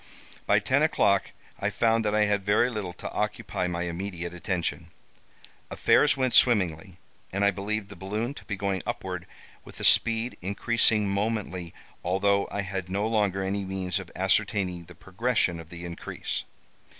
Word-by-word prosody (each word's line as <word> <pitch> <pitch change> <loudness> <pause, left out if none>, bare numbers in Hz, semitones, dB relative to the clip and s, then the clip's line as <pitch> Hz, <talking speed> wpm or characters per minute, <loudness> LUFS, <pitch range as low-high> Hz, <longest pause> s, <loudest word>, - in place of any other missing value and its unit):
"By - - +5
ten - - +2
o'clock - - +3 0.3
I 100 - 0
found 115 +1 +2
that 105 0 +1
I 105 0 +4
had 105 -1 +1
very 105 +5 +3
little 100 -6 -4
to - - -7
occupy 90 - -2
my 85 0 -2
immediate 90 0 -4
attention. 90 0 -2 0.8
Affairs 145 -1 +4
went 130 -2 +1
swimmingly, 90 -6 +3 0.3
and 100 +2 +1
I 100 - +5
believed 100 +2 -3
the 100 - -9
balloon 105 +8 -3
to - - -12
be 105 - -3
going 100 -2 -1
upward - - -4 0.4
with - - -13
a - - -5
speed 115 +1 +3
increasing 105 +2 +2
momently 100 -4 -2 0.3
although 100 +2 +2
I 100 - -2
had 95 -1 -4
no 100 +3 0
longer 105 -4 +1
any 100 +1 -1
means 95 0 -2
of 95 -3 -9
ascertaining 95 -2 +1
the 90 +1 -14
progression 95 -3 0
of 80 -1 -11
the 85 0 -8
increase. 85 -1 -5
100 Hz, 160 wpm, -27 LUFS, 90-105 Hz, 0.8 s, By